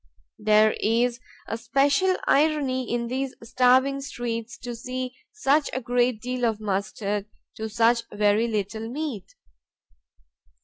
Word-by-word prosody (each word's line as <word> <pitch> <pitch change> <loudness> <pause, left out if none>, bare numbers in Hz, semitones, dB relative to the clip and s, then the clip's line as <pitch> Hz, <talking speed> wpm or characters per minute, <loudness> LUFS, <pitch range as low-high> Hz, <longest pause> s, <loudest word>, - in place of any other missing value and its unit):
There 215 0 +4
is 235 +2 +1 0.3
a 225 - -3
special 280 +10 +2
irony 275 -4 +2
in 240 0 0
these 260 +2 -3
starving 255 +3 +3
streets 230 -5 -4
to 245 -1 -6
see 255 +2 -5 0.2
such 300 -8 +2
a 260 - -1
great 245 -2 0
deal 250 0 -3
of 225 -3 +1
mustard 200 0 -2 0.3
to 220 0 -4
such 235 +2 +3
very 210 +2 +2
little 220 +1 -3
meat. 265 - -5
240 Hz, 125 wpm, -25 LUFS, 220-260 Hz, 0.3 s, There